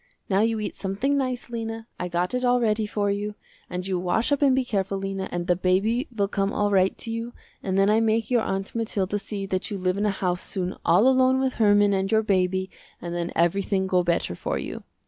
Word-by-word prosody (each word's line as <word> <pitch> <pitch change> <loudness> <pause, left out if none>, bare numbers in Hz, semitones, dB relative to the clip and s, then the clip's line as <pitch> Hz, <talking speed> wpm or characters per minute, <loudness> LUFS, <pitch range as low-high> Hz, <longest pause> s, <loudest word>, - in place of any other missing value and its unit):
Now 195 -1 +3
you 225 0 +1
eat 210 - -4
something 205 +9 -1
nice 255 -3 -2
Lena, 225 -1 -4
I 180 - -2
got 175 +3 -1
it 250 0 -1
all 245 0 +3
ready 215 -2 +1
for 205 -1 0
you, 205 +1 -3 0.3
and 180 0 -4
you 190 -2 -1
wash 185 +9 0
up 285 - +2
and 275 -3 +5
be 260 -1 +1
careful 195 -4 -1
Lena 195 0 -4
and 175 0 -2
the 180 -1 +2
baby 200 - +1
will 205 -4 0
come 195 0 -1
all 205 0 0
right 190 -1 +3
to 230 - -6
you, 230 +1 -4 0.3
and 190 -1 -1
then 195 0 +4
I 215 +2 +4
make 225 +1 +1
your 240 -2 +4
Aunt 195 -2 -3
Mathilda 205 -3 -1
see 200 -1 -5
that 185 -1 -2
you 205 - -3
live 185 0 0
in 210 +1 +1
a - - +3
house 180 -3 -1
soon 185 -1 -3
all 180 +9 +5
alone 260 0 +4
with 265 -1 0
Herman 205 -1 +5
and 195 0 0
your 220 0 +3
baby, 190 -2 +1 0.3
and 170 0 -5
then 175 0 -2
everything 190 +3 +1
go 185 -1 +2
better 170 - 0
for - - -3
you. - - -5
200 Hz, 235 wpm, -25 LUFS, 185-225 Hz, 0.3 s, and